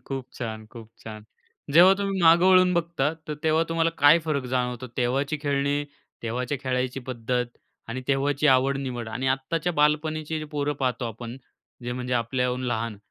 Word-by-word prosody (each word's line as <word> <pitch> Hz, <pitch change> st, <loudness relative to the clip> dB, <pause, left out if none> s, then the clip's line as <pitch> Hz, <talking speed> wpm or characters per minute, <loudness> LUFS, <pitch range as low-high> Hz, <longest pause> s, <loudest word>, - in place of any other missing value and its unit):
खूप 135 Hz, -2 st, -4 dB
छान, 110 Hz, -2 st, -5 dB
खूप 115 Hz, -2 st, -11 dB
छान. 110 Hz, -1 st, -8 dB, 0.5 s
जेव्हा 180 Hz, +5 st, +8 dB
तुम्ही 195 Hz, -1 st, -1 dB
मागे 170 Hz, +2 st, +6 dB
वळून 185 Hz, -1 st, +6 dB
बघता, 165 Hz, -3 st, 0 dB, 0.2 s
तर 150 Hz, -, -2 dB
तेव्हा 160 Hz, +1 st, +3 dB
तुम्हाला 165 Hz, 0 st, +1 dB
काय 145 Hz, +3 st, +7 dB
फरक 140 Hz, -4 st, -1 dB
जाणवतो 125 Hz, 0 st, -1 dB
तेव्हाची 135 Hz, +4 st, 0 dB
खेळणी, 145 Hz, 0 st, 0 dB, 0.4 s
तेव्हाच्या 125 Hz, +4 st, -2 dB
खेळायची 130 Hz, 0 st, -1 dB
पद्धत 125 Hz, 0 st, -2 dB, 0.3 s
आणि 120 Hz, +3 st, -4 dB
तेव्हाची 140 Hz, +2 st, +1 dB
आवड-निवड 130 Hz, -3 st, +1 dB
आणि 125 Hz, +4 st, -3 dB
आत्ताच्या 150 Hz, +6 st, -1 dB
बालपणीची 155 Hz, +1 st, 0 dB
पोरं 145 Hz, 0 st, -1 dB
पाहतो 125 Hz, -1 st, 0 dB
आपण. 115 Hz, +2 st, -8 dB, 0.5 s
जे 120 Hz, 0 st, -3 dB
म्हणजे 125 Hz, 0 st, -4 dB
आपल्याहून 125 Hz, +1 st, -1 dB
लहान. 115 Hz, -2 st, -2 dB
135 Hz, 150 wpm, -25 LUFS, 125-155 Hz, 0.5 s, जेव्हा